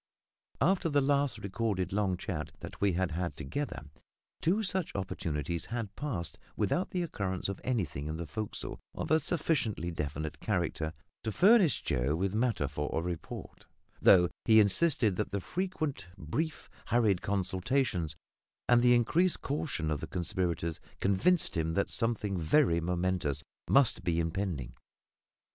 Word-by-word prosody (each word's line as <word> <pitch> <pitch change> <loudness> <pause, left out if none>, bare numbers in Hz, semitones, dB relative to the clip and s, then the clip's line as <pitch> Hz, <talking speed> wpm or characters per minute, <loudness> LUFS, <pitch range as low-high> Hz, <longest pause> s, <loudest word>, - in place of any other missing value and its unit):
After 185 -1 +3
the 145 -1 +3
last 140 0 +2
recorded 100 -2 -2
long 100 -3 +1
chat 85 -5 -4
that - - -9
we 100 -2 +3
had 90 0 0
had 85 +2 -2
together, 80 - -4 0.6
two 195 +7 +2
such 190 -3 -1
opportunities 85 -4 -2
had 115 -4 -4
passed 105 - -4 0.2
without 110 - +1
the 180 -1 -1
occurrence 95 - -2
of 100 -1 -5
anything 90 - -1
in 80 - -3
the 85 +1 -4
forecastle 110 +6 -5 0.2
of - - -4
a 160 - +6
sufficiently 140 - 0
definite 75 -1 -4
character 85 -6 -1 0.3
to 110 - -1
furnish 195 - +5
Joe 70 +1 +1
with 95 +3 -1
matter 110 - +1
for 75 +2 -3
a - - 0
report; 85 -1 -6 0.3
though 90 -2 +7 0.2
he 110 -1 +7
insisted 110 - +3
that 105 - -1
the 100 - -1
frequent 155 - -3
brief, 150 - -3 0.2
hurried 110 -6 +3
consultations, 95 - 0 0.5
and 120 -1 +5
the 120 0 +6
increased 165 +10 +2
caution 135 - -2
of 75 - 0
the - - -5
conspirators, 85 -2 -2 0.2
convinced 100 - +2
him 80 0 0
that 100 - +1
something 105 -5 -1
very 85 - +3
momentous 90 -4 -1 0.3
must 135 -3 +4
be 85 -1 +1
impending. 80 -6 -2
100 Hz, 145 wpm, -31 LUFS, 85-135 Hz, 0.6 s, though